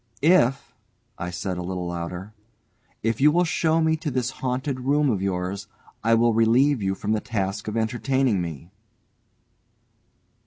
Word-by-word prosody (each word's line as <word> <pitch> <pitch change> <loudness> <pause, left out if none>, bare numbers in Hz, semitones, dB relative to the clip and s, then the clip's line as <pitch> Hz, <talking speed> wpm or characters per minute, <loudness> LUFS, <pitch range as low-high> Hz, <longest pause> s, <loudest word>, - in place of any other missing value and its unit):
"If," 145 -6 +3 0.5
I 90 - -3
said 90 +1 -4
a - - -3
little 90 0 -4
louder, 85 +4 -5 0.7
"if 115 +2 0
you 150 +2 +6
will 175 +3 +3
show 160 -1 +1
me 160 0 +3
to 155 -1 -3
this 130 -1 -1
haunted 130 +1 -2
room 140 +2 +2
of 100 -4 -1
yours, 95 +1 -2 0.4
I 115 +1 +4
will 115 0 +3
relieve 120 +4 +3
you 95 0 0
from 105 +2 -3
the 110 -1 +1
task 100 -3 -3
of 105 +1 -2
entertaining 120 -1 +1
me." 85 0 -7
115 Hz, 155 wpm, -24 LUFS, 95-135 Hz, 0.7 s, you